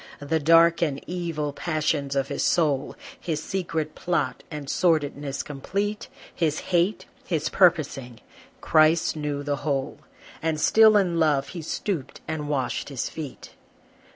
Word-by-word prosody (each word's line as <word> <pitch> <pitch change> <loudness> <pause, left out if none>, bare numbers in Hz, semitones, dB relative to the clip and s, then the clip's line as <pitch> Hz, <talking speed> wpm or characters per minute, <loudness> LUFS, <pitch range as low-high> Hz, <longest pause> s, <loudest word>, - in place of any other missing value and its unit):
The 150 +3 -1
dark 165 +2 +5
and 145 -5 0
evil 165 -5 -3
passions 155 -3 -1
of 135 0 0
his 140 - -2
soul, 145 -5 +1 0.2
His 160 - -3
secret 165 -5 -3
plot, 175 -1 -1
and 150 -3 -7
sordidness 145 -4 0
complete, 200 +9 -3 0.3
His 155 -3 0 0.2
hate, 175 +3 +2 0.2
his 165 -4 -1
purposing, 150 -9 +2 0.4
Christ 155 +2 +3
knew 145 -2 -3
the 145 0 -1
whole, 140 -1 -2 0.4
And 160 -1 -1
still 220 +5 +6
in 175 -4 +1
love 150 -4 +2
he 175 - -6
stooped 160 -1 -4
and 150 -2 -4
washed 135 -3 -2
his 135 -4 -3
feet. 150 -4 -8
155 Hz, 135 wpm, -25 LUFS, 145-170 Hz, 0.4 s, still